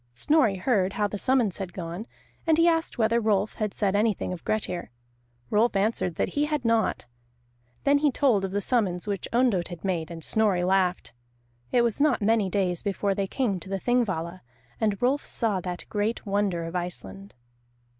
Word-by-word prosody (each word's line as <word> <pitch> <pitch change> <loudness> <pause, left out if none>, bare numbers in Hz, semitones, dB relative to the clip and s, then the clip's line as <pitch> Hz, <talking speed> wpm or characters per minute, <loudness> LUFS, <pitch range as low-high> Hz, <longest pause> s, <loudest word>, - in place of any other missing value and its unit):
Snorri 290 - +3
heard 190 -1 +1
how 210 -1 +1
the 205 0 -5
summons 245 -7 +1
had 185 -3 -5
gone, 175 +5 -6 0.4
and 320 -1 +4
he 335 +1 +5
asked 325 -1 +1
whether 230 0 +3
Rolf 210 -1 +1
had 210 -1 0
said 200 -1 0
anything 210 -3 +1
of 175 - -8
Grettir. 185 -5 -2 0.6
Rolf 220 +1 +3
answered 195 -4 0
that - - 0
he 290 +1 0
had 300 -4 -2
not. 230 -1 +1 0.8
Then 285 0 +4
he 295 0 +3
told 250 -7 +2
of 195 - -1
the 200 +2 -1
summons 200 -6 0
which 200 -3 -2
Ondott 235 -8 +2
had 175 0 -9
made, 170 -4 -1
and 165 -1 -8
Snorri 205 -3 +2
laughed. 185 -4 +1 0.6
It 240 - +4
was 235 +3 0
not 295 -4 +3
many 215 -2 +2
days 180 -3 0
before 200 0 0
they 195 0 -1
came 210 -5 -1
to 190 - -10
the 195 0 -2
Thingvalla, 185 -8 -1 0.4
and 210 -3 0
Rolf 270 +4 +2
saw 215 -5 0
that 180 -1 -5
great 215 +3 -2
wonder 200 -4 0
of 165 +2 -6
Iceland. 180 +3 -6
205 Hz, 185 wpm, -26 LUFS, 185-235 Hz, 0.8 s, he